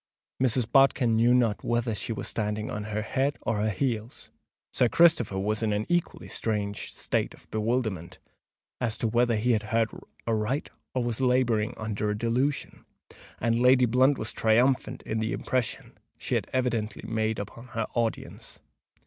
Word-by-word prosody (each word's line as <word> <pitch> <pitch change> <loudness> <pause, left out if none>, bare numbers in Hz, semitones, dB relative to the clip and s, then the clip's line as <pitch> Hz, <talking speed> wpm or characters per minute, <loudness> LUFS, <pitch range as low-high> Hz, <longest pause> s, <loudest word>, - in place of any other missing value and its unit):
Mrs. 125 -2 +2
Bodkin 135 -4 +4
knew 115 +2 +4
not 120 -4 +2
whether 120 -1 0
she 105 +3 -4
were 110 - -3
standing 105 0 -3
on 105 0 -4
her 105 0 -2
head 135 +5 0
or 110 0 0
her 105 +1 +1
heels: 115 +2 -3 0.4
Sir 125 - +3
Christopher 160 - +4
was 105 +3 0
in 110 -1 +1
an 105 +1 -1
equally 175 -1 -1
strange 105 -2 -3
state - - -1
of - - -18
bewilderment 110 -6 -1 0.6
as 115 -3 -1
to 115 - 0
whether 120 +1 +2
he 115 +4 +1
had 110 -3 +2
heard 115 -1 +2 0.4
aright 115 +5 -1 0.2
or 125 - +1
was 120 +1 -2
labouring 125 -4 +2
under 105 -1 -2
a 105 - -1
delusion; 125 +6 -1 0.6
and 115 0 +1
Lady 125 +1 +6
Blunt 130 +4 +3
was 110 - -4
triumphant 120 +4 +2
in 110 - -2
the 110 0 -1
impression 125 -3 -2 0.2
she - - -4
had - - 0
evidently 120 -4 -1
made 110 -1 0
upon 115 +4 -7
her 115 -2 -2
audience. 115 -2 -3
115 Hz, 165 wpm, -27 LUFS, 110-125 Hz, 0.6 s, Lady